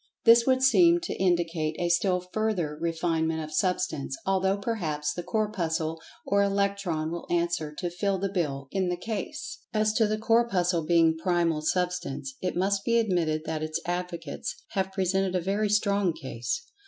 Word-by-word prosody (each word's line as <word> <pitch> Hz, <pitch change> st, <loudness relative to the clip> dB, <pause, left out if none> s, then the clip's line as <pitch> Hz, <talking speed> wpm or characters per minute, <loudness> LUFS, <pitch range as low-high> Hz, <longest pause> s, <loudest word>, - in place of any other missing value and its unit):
This 235 Hz, +1 st, +6 dB
would 260 Hz, 0 st, +3 dB
seem 340 Hz, +5 st, +6 dB
to 355 Hz, -, -3 dB
indicate 170 Hz, -4 st, +1 dB
a 175 Hz, -, 0 dB
still 180 Hz, +1 st, +2 dB
further 205 Hz, -9 st, 0 dB
refinement 160 Hz, -1 st, 0 dB
of 155 Hz, 0 st, -8 dB
Substance, 180 Hz, -6 st, -1 dB
although 195 Hz, 0 st, +2 dB
perhaps 160 Hz, -9 st, -2 dB
the 175 Hz, -, -4 dB
"Corpuscle" 165 Hz, -6 st, -1 dB, 0.2 s
or 200 Hz, 0 st, +2 dB
"Electron" 200 Hz, -5 st, 0 dB
will 170 Hz, 0 st, -5 dB
answer 170 Hz, -3 st, 0 dB
to 175 Hz, -, -3 dB
"fill 195 Hz, +2 st, 0 dB
the 195 Hz, +2 st, -1 dB
bill" 140 Hz, -7 st, -2 dB
in 190 Hz, -2 st, 0 dB
the 180 Hz, -, -1 dB
case. 230 Hz, +9 st, -5 dB, 0.2 s
As 215 Hz, 0 st, +2 dB
to 220 Hz, -1 st, +3 dB
the 215 Hz, +1 st, 0 dB
Corpuscle 195 Hz, -7 st, +2 dB
being 165 Hz, -1 st, +4 dB
"Primal 170 Hz, -3 st, +1 dB
Substance," 180 Hz, -5 st, -2 dB
it 180 Hz, -, -2 dB
must 195 Hz, +2 st, +1 dB
be 235 Hz, -1 st, +2 dB
admitted 170 Hz, -8 st, +1 dB
that 160 Hz, -2 st, -3 dB
its 155 Hz, +1 st, -2 dB
advocates 175 Hz, -, -4 dB
have 190 Hz, -2 st, -1 dB
presented 190 Hz, 0 st, 0 dB
a -, -, +3 dB
very 200 Hz, +4 st, 0 dB
strong 200 Hz, -3 st, +2 dB
case. 130 Hz, -, -4 dB
180 Hz, 165 wpm, -27 LUFS, 165-200 Hz, 0.2 s, This